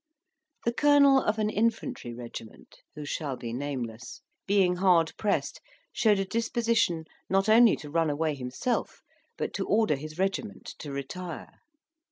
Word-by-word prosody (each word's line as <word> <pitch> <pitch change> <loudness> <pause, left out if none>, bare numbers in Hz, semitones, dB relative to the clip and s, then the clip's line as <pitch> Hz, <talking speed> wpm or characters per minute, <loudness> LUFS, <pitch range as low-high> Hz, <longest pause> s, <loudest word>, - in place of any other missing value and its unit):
The 235 - +1
colonel 280 0 +5
of 210 +1 0
an 215 -1 0
infantry 230 - -1
regiment, 115 -2 -10 0.2
who 150 -1 -6
shall 145 -2 -3
be 120 -2 -6
nameless, 120 -4 -5 0.3
being 190 -3 +3
hard 175 -3 +3
pressed, 205 -2 -1 0.3
showed 215 -3 +3
a 195 - 0
disposition 230 -6 0 0.2
not 195 +1 +2
only 225 +1 +7
to 150 -1 -10
run 165 0 +2
away 155 +1 0
himself, 130 - -3 0.3
but - - -3
to - - -3
order 215 -8 +3
his 155 +3 -8
regiment 195 +2 -3
to 145 - -7
retire. 155 +5 -7
180 Hz, 145 wpm, -28 LUFS, 145-220 Hz, 0.3 s, only